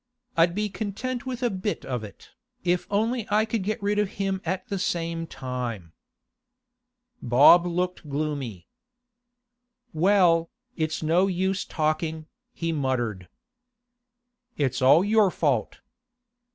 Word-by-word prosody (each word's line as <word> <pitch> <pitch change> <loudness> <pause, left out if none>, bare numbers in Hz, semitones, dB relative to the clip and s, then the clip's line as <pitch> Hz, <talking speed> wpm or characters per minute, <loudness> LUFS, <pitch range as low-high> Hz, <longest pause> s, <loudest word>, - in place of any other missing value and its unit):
'I'd 170 +1 +3
be 210 +1 0
content 220 +6 -4
with 255 -1 -4
a 240 - +2
bit 195 +2 -3
of 125 -4 -3
it, 105 - -12 0.3
if 180 0 0
only 225 +3 0
I 210 +1 +3
could 225 -1 -2
get 210 +3 -2
rid 205 +1 +1
of 210 -2 -1
him 195 -1 -1
at 185 +2 -3
the 200 - -3
same 165 -2 -2
time.' 120 - -5 1.3
Bob 145 +8 +6
looked 180 -2 -2
gloomy. 140 - -3 1.3
'Well, 170 -1 +3 0.3
it's 160 -1 -2
no 170 +5 +3
use 190 +1 -1
talking,' 155 0 -1 0.3
he 165 -8 -3
muttered. 120 - -2 1.3
'It's 140 -3 0
all 150 +8 +6
your 215 -1 +4
fault. - - -1
175 Hz, 125 wpm, -26 LUFS, 150-200 Hz, 1.3 s, Bob